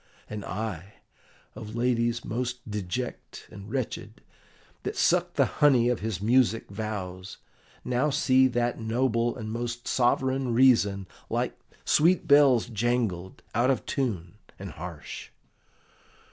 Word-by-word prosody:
And 105 -1 -6
I, 100 -1 -5 0.6
of 110 0 -8
ladies 120 -1 0
most 120 +1 -3
deject 105 +5 -5
and 100 +1 -10
wretched, 130 0 -4 0.6
that - - -4
sucked - - +2
the - - +4 0.2
honey 130 -5 +5
of 125 - 0
his 110 -3 -3
music 115 0 +2
vows, 100 -3 -5 0.5
now 125 +4 +1
see 130 -3 +4
that 120 -1 -1
noble 115 +1 0
and 110 -2 -6
most 120 +1 -4
sovereign 130 0 +1
reason, 110 -6 +4 0.2
like - - -1 0.3
sweet 170 +2 +3
bells 140 -5 +6
jangled, 110 -6 -2
out 120 +3 +2
of 135 - 0
tune 105 - -3 0.2
and 95 -2 -7
harsh! 85 0 -8
115 Hz, 120 wpm, -27 LUFS, 105-125 Hz, 0.6 s, bells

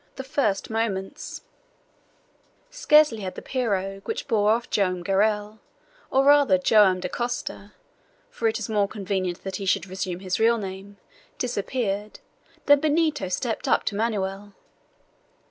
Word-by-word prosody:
THE 265 - -6
FIRST 225 -7 -1
MOMENTS 210 -4 -3 1.3
Scarcely 300 - +4
had 190 -2 -5
the - - -8
pirogue 195 -6 -2
which - - -4
bore 210 -2 +2
off 230 +2 +1
Joam 185 -3 0
Garral, 210 +2 0 0.5
or 270 - +3
rather 285 -9 +6
Joam 190 -1 +4
Dacosta 210 +1 -4 0.6
for 230 - -1
it 220 - 0
is 220 - -4
more 210 -2 +1
convenient 190 -3 -3
that 190 -1 -4
he 195 - -5
should 190 -1 +1
resume 185 -1 -5
his 185 -1 -2
real 230 +1 +4
name 195 0 -7 0.4
disappeared, 210 -3 -3 0.5
than 290 0 +6
Benito 310 - +1
stepped 225 +5 -2
up - - +3
to 205 - -2
Manoel. 205 -2 -2
205 Hz, 135 wpm, -25 LUFS, 195-235 Hz, 1.3 s, rather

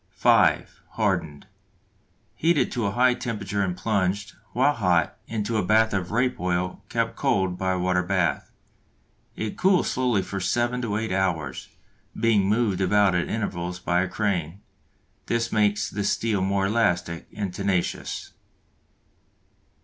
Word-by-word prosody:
(5) - - +3
Hardened. 75 -2 -1 0.9
Heated 165 -2 +2
to 115 -5 -1
a - - -1
high 125 +1 +4
temperature 105 -5 -3
and 90 -2 -1
plunged, 100 0 -1 0.2
while 135 +4 +3
hot, 90 - +1
into 110 0 -2
a 105 - +1
bath 110 +3 +3
of 90 -3 -1
rape 125 +4 0
oil 90 +2 -2
kept 115 -1 -1
cold 95 -2 +1
by 95 0 -1
a - - -1
water 90 0 +1
bath. 90 -5 0 0.9
It 110 -1 -5
cools 190 -1 +3
slowly 125 -6 +1
for 95 +1 -5
seven 120 +6 0
to 105 -4 -1
eight 110 -1 -3
hours, 85 -8 -1 0.5
being 110 -4 +3
moved 105 -4 +1
about 100 +1 +3
at 90 -1 0
intervals 90 -5 -3
by 90 0 +1
a 95 - 0
crane. 100 -4 -2 0.7
This 115 0 0
makes 105 -1 +2
the 105 +1 -3
steel 105 0 0
more 95 +1 +1
elastic 90 -6 0
and 100 -3 -4
tenacious. 95 -2 -2
100 Hz, 140 wpm, -25 LUFS, 90-115 Hz, 0.9 s, high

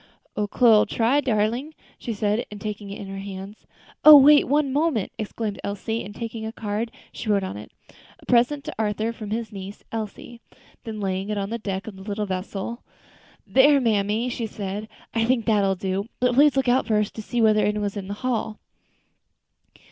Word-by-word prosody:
"Ole 210 -1 -1
Chloe'll 220 0 +5
try, 245 +6 +2
darlin," 240 +5 -1 0.2
she 235 - -4
said, 210 +1 -1
taking 210 -1 -5
it 200 - -7
in 200 - -7
her 195 0 -6
hands. 195 +1 -9 0.4
"Oh! 305 -1 +12
wait 290 +2 +7
one 280 0 +1
moment," 290 - 0
exclaimed 215 -1 -4
Elsie, 220 +3 -3
and 205 +1 -9
taking 230 -1 -5
a 220 - -4
card, 225 0 -3 0.2
she 220 - -6
wrote 200 -2 +2
on 185 - -4
it, 105 - -10 0.5
"A - - -18
present 255 +4 +2
to - - -6
Arthur, 215 +1 -1
from 215 -2 -8
his 225 0 -3
niece 195 0 -9
Elsie." 225 +2 -6 0.4
Then 220 -2 -5
laying 190 0 -2
it 210 - -1
on 200 +1 -3
the 235 - -3
deck 195 -3 -4
of 220 - -8
the - - -11
little 210 +1 -3
vessel. 195 +4 -4 0.6
"There, 280 +2 +5
mammy," 220 -1 +1
she 235 -2 -3
said, 205 0 -5 0.3
"I 230 - +1
think 235 -1 +1
that 215 -2 +3
will 195 -1 +2
do; 190 +2 -3
but 250 0 +2
please 285 +2 +5
look 265 -1 +1
out 250 +2 +3
first 210 -1 +1
to 220 - -6
see 240 +3 -3
whether 215 -2 +4
any 210 0 +1
one 210 - -1
is 200 - -3
in 195 -2 -5
the 200 - -4
hall." 225 -3 -1
215 Hz, 200 wpm, -24 LUFS, 200-235 Hz, 0.6 s, Oh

